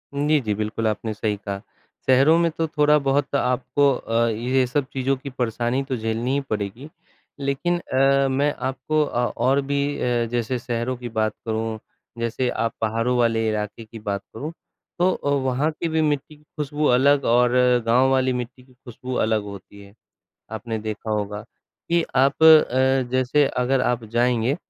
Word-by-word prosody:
जी, 150 +1 +2
जी। 105 -4 -1
बिल्कुल, 110 +1 -2
आपने 110 +1 -2
सही 105 0 -2
कहा। 100 -1 -6 0.5
शहरों 135 +5 +5
में 170 0 +2
तो 160 +1 -2
थोड़ा-बहुत 145 -2 +2
आपको 135 +2 +2
अ, 115 0 0
ये 125 +4 +1
सब 135 +2 -1
चीज़ों 135 +1 0
की 140 +2 -8
परेशानी 125 +1 -1
तो 135 -1 -3
झेलनी 115 +3 -2
ही 140 - +1
पड़ेगी। 105 +7 -4 0.5
लेकिन 140 +6 -1
अ, 135 -1 +2
मैं 140 +2 +1 0.2
आपको 155 +4 -1
अ, 125 -4 -1
और 130 +4 +2
भी 140 +1 -1
अ, 120 -1 0
जैसे 120 +1 -1
शहरों 120 +1 -3
की 120 0 -7
बात 110 -1 -1
करूँ, 110 0 -2 0.4
जैसे 115 +2 -1
आप 115 -1 -2
पहाड़ों 115 +3 0
वाले 115 -2 +2
इलाके 105 +1 -4
की 110 +1 -11
बात 100 -2 -3
करूँ, 145 +8 -5 0.5
तो 180 +1 +4
अ, 145 - -3
वहाँ 140 +2 +1
की 165 +2 -4
भी 160 0 +1
मिट्टी 150 0 -1
की 150 - -24
ख़ुशबू 150 0 -4
अलग 140 +2 +3
और 125 0 +3 0.3
गाँव 125 +3 +4
वाली 130 -1 +2
मिट्टी 125 +1 -6
की 130 - -23
ख़ुशबू 125 0 -9
अलग 110 -2 +1
होती 100 0 -11
है। 100 0 -16 0.6
आपने 110 +1 -4
देखा 110 0 -5
होगा, 105 0 -2
कि 115 +9 -4
आप 135 +3 +2
अ, 135 -4 +6
जैसे 130 +3 +2
अगर 130 +1 0
आप 125 -2 0
जाएँगे, 120 +3 +1
125 Hz, 170 wpm, -23 LUFS, 115-140 Hz, 0.6 s, अ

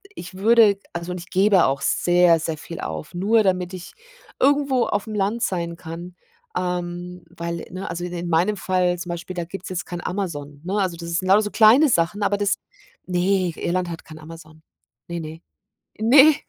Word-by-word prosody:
ich 180 - -9
würde, 210 +1 +5
also, 170 +1 -5
und 180 - -4
ich 175 - -11
gebe 195 -1 +4
auch 135 +1 0
sehr, 175 -2 +3
sehr 160 -1 -3
viel 165 +2 -8
auf, 80 - -6
nur 210 +5 +3
damit 185 -1 0
ich 180 -1 -9 0.5
irgendwo 275 -2 +3
auf'm 210 +1 -2
Land 210 +4 0
sein 170 -2 -2
kann. 170 +2 -8 0.4
Ähm, 180 0 -4
weil, 170 0 -5
ne, 185 0 -6
also, 170 +1 -4
de 175 -1 -4
in 175 - -4
meinem 180 +6 +2
Fall 180 -1 +1
zum 175 - -6
Beispiel, 175 +2 -6
da 170 -1 -3
gibt's 185 +2 -8
jetzt 180 -1 -4
kein 175 0 -6
Amazon, 150 -7 -4
ne? 190 - -3
Also, 180 -3 -1
das 170 0 -7
ist 170 - 0
sind 185 - -4
lauter 210 +2 +6
so 210 - -4
kleine 230 +8 +6
Sachen, 175 +1 +1
aber 200 0 +1
das 200 -1 +1 0.5
ne, 180 -1 +1
Irland 180 0 -1
hat 165 - -7
kein 155 0 -12
Amazon. 155 0 -13 0.5
Ne, 170 0 -4
ne? 160 +1 -8 0.6
Ne. 275 +7 +7
180 Hz, 195 wpm, -22 LUFS, 170-200 Hz, 0.6 s, Ne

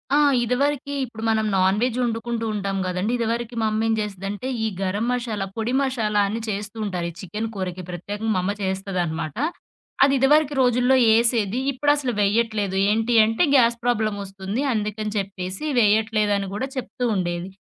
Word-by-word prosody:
ఆ! - - +5 0.3
ఇదివరకి 280 +3 0
ఇప్పుడు 225 -2 -9
మనం 220 -1 +2
నాన్‌వెజ్ 205 +6 +2
వండుకుంటూ 230 -1 -2
ఉంటాం 200 -1 -2
గదండీ! 185 +5 -1
ఇదివరకి 235 0 -2
మా - - +1
అమ్మ 215 +1 0
ఏం 225 - +2
జేసేదంటే 205 +3 -4 0.2
ఈ - - +2
గరం 200 +4 -1
మషాలా, 235 -5 -2
పొడి 225 +2 -1
మషాలా 225 -6 +1
అని 215 +3 -3
చేస్తూ 205 +1 -4
ఉంటారు 180 -4 -2
ఈ - - -10
చికెను 210 +5 -4
కూరకి 185 -1 -4
ప్రత్యేకంగా 205 +5 -3
మా - - +2
అమ్మ 195 - 0
చేస్తదనమాట. 180 -4 -2 0.7
అది 275 0 +4
ఇదివరకి 295 +2 +4
రోజుల్లో 250 +1 +3 0.2
ఏసేది. 230 -1 +1
ఇప్పుడసలు 290 -1 +1
వేయట్లేదు. 205 -1 +1
ఏంటి 225 +3 +1
అంటే 225 +8 +1
"గ్యాస్ 235 -3 +5
ప్రాబ్లమ్ 220 -4 0
ఒస్తుంది. 195 +4 -4
అందుకని 215 0 -2
చెప్పేసి 190 +1 -4 0.2
వేయట్లేదు" 215 -1 +3
అని 200 0 -3
కూడా 255 +6 -2
చెప్తూ 255 -1 -5
ఉండేది. 175 -1 -2
215 Hz, 155 wpm, -23 LUFS, 195-240 Hz, 0.7 s, ఆ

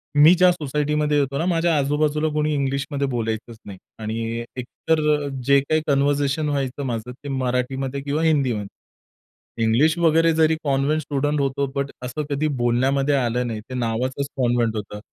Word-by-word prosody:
मी 150 +4 +8
ज्या 180 0 +5
सोसायटीमध्ये 150 -1 0
येतो 140 0 -1
ना 165 - -1
माझ्या 170 -2 +2
आजूबाजूला 150 +2 +1
कुणी 150 0 0
इंग्लिशमध्ये 140 0 -1
बोलायचंच 115 -2 -3
नाही. 100 -2 -9 0.2
आणि 115 +1 -3 0.2
एकतर 155 +5 -1 0.5
जे 140 0 +6
काही 155 +3 0
कन्व्हर्सेशन 145 +2 +1
व्हायचं 140 -1 -2
माझं 120 -1 -4
ते 140 +3 -10
मराठीमध्ये 130 +1 -2
किंवा 145 +3 -1
हिंदीमध्ये. 130 -10 +1 1.0
इंग्लिश 135 +9 +3
वगैरे 165 0 +3
जरी 160 0 +3
कॉन्व्हेंट 145 +2 +1
स्टुडंट 145 +1 -1
होतो 140 0 0
बट 140 0 -2
असं 150 +5 -3
कधी 145 +2 0 0.2
बोलण्यामध्ये 135 +4 +2
आलं 125 -1 0
नाही. 110 -2 -4
ते 130 - -7
नावाचंच 125 +3 -2
कॉन्व्हेंट 120 -3 +1
होतं. 105 0 -6
140 Hz, 150 wpm, -22 LUFS, 125-150 Hz, 1.0 s, मी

